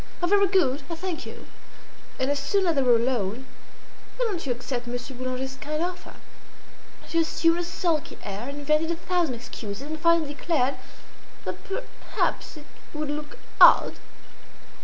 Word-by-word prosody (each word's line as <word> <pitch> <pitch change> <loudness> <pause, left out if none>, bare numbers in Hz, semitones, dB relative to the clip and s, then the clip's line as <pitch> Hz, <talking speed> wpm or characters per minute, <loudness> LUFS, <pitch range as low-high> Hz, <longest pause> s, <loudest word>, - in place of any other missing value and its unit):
"Ah! 350 - +1
very 400 +2 +5
good! 305 -8 +2
I 335 - -3
thank 355 -1 -4
you." - - -9 0.7
And 260 +2 +1
as 285 - 0
soon 385 +8 +1
as 340 - +3
they 280 - +2
were 250 -2 +5
alone, 235 -1 0 0.7
"Why - - +1
don't 390 -7 -2
you - - +1
accept 245 0 -3
Monsieur 245 +2 -5
Boulanger's 255 +1 -4
kind 305 +2 -2
offer?" 360 0 -5 0.9
She 335 - +1
assumed 330 +1 +2
a - - 0
sulky 340 -3 -1
air, 205 +6 -5
invented 305 +3 +1
a 335 - +1
thousand 340 -5 0
excuses, 230 -2 -7
and 310 +2 -5
finally 335 -2 +3
declared 285 -4 0 0.7
that - - -3
perhaps 390 -5 -3
it 295 - -12 0.3
would 300 -1 -2
look 300 +11 -5 0.2
odd. - - +8
300 Hz, 160 wpm, -26 LUFS, 255-335 Hz, 0.9 s, odd